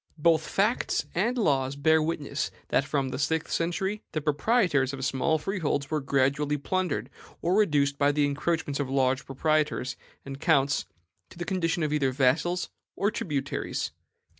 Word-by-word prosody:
"Both 160 0 +3
facts 210 +5 +1
and 230 +8 +1
laws 135 - +1
bear 160 +3 +3
witness 150 -3 -2 0.2
that 135 - +2
from 140 -2 -1
the 130 - -4
sixth 145 - +2
to - - -10
the 160 -1 +1
tenth - - -13 0.2
century 195 +4 -2
the 155 - -1
proprietors 150 - +2
of 135 -1 -3
small 155 +3 +1
freeholds 155 -5 -2
were 155 -1 0
gradually 140 +2 +1
plundered, 180 +2 -2 0.3
or 175 - 0
reduced 145 -9 +2
by 145 0 +4
the 145 0 +2
encroachments 145 0 -1
of 140 -2 -2
large 135 0 +1
proprietors 150 -1 0 0.3
and 135 0 -7
counts 140 -4 +2 0.4
to - - -15
the 175 - -4
condition 170 -3 0
of 150 -1 0
either 140 -3 +2
vassals 145 +7 +1 0.2
or 200 +2 +1
tributaries. 145 -9 -3
150 Hz, 165 wpm, -27 LUFS, 140-170 Hz, 0.4 s, by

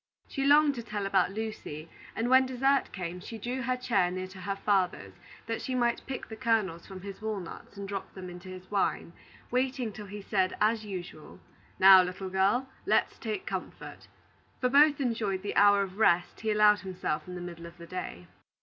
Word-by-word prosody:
She 275 - -3
longed 295 0 +6
to 240 - -5
tell 210 -3 -4
about 195 -2 +2
Lucy; 200 -8 -6 0.3
and 230 - -1
when 260 +1 +5
dessert 270 +2 +1
came, 180 -2 -5
she 225 +5 -8
drew 245 +4 -3
her 255 0 0
chair 200 -8 +1
near 185 +1 -4
to 190 0 -11
her 195 +2 -2
father's, 185 - 0 0.3
that 225 0 -3
she 260 - -3
might 240 -1 0
pick 265 -1 -5
the 220 - -8
kernels 215 -8 0
from 190 -1 -9
his 200 +1 -8
walnuts 205 -2 -6
and 200 0 -5
drop 195 -1 -5
them 185 -1 -7
into 180 +1 -10
his 185 +1 -10
wine, 195 -4 0 0.4
waiting 255 -2 0
till 205 0 -9
he 205 +1 -8
said, 190 -2 0
as 220 +1 +2
usual: 180 -6 -8 0.4
"Now, 190 0 +9
little 185 +1 -4
girl, 200 +8 +2 0.2
let's - - +2
take 405 -2 -4
comfort." - - -6 0.5
For 250 - +1
both 290 +2 +5
enjoyed 220 -7 -1
the 205 - -3
hour 205 0 +6
of 195 +1 -8
rest 175 -4 +3
he 220 - -1
allowed 210 -1 +5
himself 180 -5 -3
in 180 - -7
the - - -5
middle 170 -1 -8
of 170 +1 -14
the 170 - -10
day. 165 - -6
200 Hz, 195 wpm, -29 LUFS, 185-235 Hz, 0.5 s, Now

